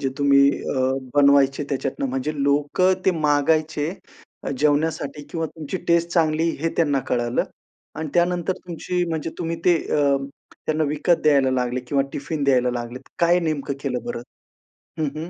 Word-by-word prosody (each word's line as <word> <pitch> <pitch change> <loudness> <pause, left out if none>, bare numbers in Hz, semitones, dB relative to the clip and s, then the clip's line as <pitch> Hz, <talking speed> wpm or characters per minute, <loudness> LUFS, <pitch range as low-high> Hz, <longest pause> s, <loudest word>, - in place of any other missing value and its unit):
जे 135 - 0
तुम्ही 140 -1 +5 0.3
अ, 130 0 +1 0.2
बनवायचे 140 0 +4
त्याच्यातून. 135 -1 -2
म्हणजे 130 +4 -2
लोकं 145 +6 +2
ते 190 - +5
मागायचे 150 +1 +1 0.6
अ, - - -1
जेवण्यासाठी 150 0 0
किंवा 165 -1 -2
तुमची 160 +2 -6
टेस्ट 170 0 +3
चांगली 160 -1 +2
हे 165 - +1
त्यांना 145 -5 +2
कळालं 120 -1 0 0.5
आणि 160 - -3
त्यानंतर 175 +1 +2
तुमची 175 +1 -2
म्हणजे 160 -1 -3
तुम्ही 165 -1 -2
ते 175 -2 +5 0.2
अ, 140 -2 +3 0.5
त्यांना 155 0 +1
विकत 155 +4 +1
द्यायला 140 -3 +4
लागले 125 -1 -1
किंवा 135 +3 0
टिफिन 145 +1 -3
द्यायला 125 -2 +3
लागले. 120 +1 -5 0.2
काय 170 +1 +4
नेमकं 150 -4 -2
केलं 125 -4 -2
बरं? 120 0 -4 0.8
हं, 155 - +1
हं. 160 +3 -5
145 Hz, 155 wpm, -23 LUFS, 135-165 Hz, 0.8 s, तुम्ही